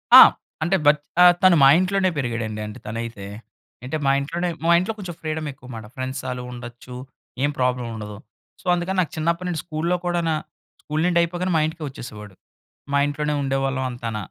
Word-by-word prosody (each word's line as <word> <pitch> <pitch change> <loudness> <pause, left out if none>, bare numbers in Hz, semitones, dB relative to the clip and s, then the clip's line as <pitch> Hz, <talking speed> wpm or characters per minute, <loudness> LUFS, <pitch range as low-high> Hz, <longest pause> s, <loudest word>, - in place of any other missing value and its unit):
ఆ! - - +14 0.4
అంటే, 175 +5 +2
బత్ 145 0 +5 0.2
ఆహ్, 180 0 +9
తను 185 -2 +7
మా - - +9
ఇంట్లోనే 185 0 +2
పెరిగాడండి. 115 -5 -2
అంటే 105 +4 -9
తనైతే. 115 -2 -5 0.6
అంటే, 130 - -3
మా 135 - +4
ఇంట్లోనే 170 +5 -2 0.2
మా - - +5
ఇంట్లో 185 +5 -2
కొంచెం 180 -4 -6
ఫ్రీడమ్ 155 -1 -3
ఎక్కువమాట. 125 -4 -10
ఫ్రెండ్స్ 130 +1 -4
ఆలు 125 0 -4
ఉండొచ్చు. 120 0 -9 0.5
ఏం 145 - +3
ప్రాబ్లమ్ 125 -1 0
ఉండదు. 105 -1 -7 0.4
సో, - - -26
అందుకని 175 +2 -1
నాకు 165 - -3
చిన్నప్పడినుండి 170 +1 -1
స్కూల్‌లో 170 +2 -1
కూడానా 170 -2 +1 0.5
స్కూల్ 150 +1 -2
నుండి 175 -1 +3
అయిపోగానే 175 +2 -1
మా - - +3
ఇంటికే 160 0 -7
వచ్చేసేవాడు. 105 -6 -10 0.6
మా 140 - +3
ఇంట్లోనే 150 +1 -1
ఉండేవాళ్ళం 135 -1 -1
అంతాన. 115 -3 -4
145 Hz, 170 wpm, -23 LUFS, 125-170 Hz, 0.6 s, ఆ